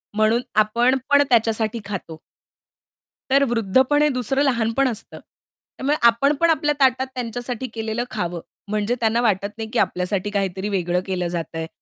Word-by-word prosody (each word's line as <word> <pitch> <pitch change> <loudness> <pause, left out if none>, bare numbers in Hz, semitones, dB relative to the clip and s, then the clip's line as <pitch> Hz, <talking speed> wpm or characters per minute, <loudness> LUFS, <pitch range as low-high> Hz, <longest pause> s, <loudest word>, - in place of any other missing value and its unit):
म्हणून, 220 +3 +3
आपण 235 +5 +3
पण 285 0 +6
त्याच्यासाठी 225 -1 +1
खातो. 180 -5 -6 1.1
तर 275 +1 +4
वृद्धपण 255 +7 +2
हे 300 - +4
दुसरं 270 +4 +1
लहानपण 245 0 +1
असतं. 225 -4 -5
त्यामुळे 290 +3 -6
आपण 275 +6 +3
पण 335 0 +3
आपल्या 295 -2 +2
ताटात 260 0 +3
त्यांच्यासाठी 245 +1 -4
केलेलं 225 +1 -2
खावं. 175 -1 -3 0.3
म्हणजे 215 +3 0
त्यांना 230 +1 +1
वाटत 200 -4 +1
नाही, 220 -1 -5
की - - +1
आपल्यासाठी 185 +2 -1
काहीतरी 195 0 -2
वेगळं 180 -2 0
केलं 180 -2 -2
जात 170 -1 -5
आहे. 160 0 -3
225 Hz, 150 wpm, -22 LUFS, 200-260 Hz, 1.1 s, पण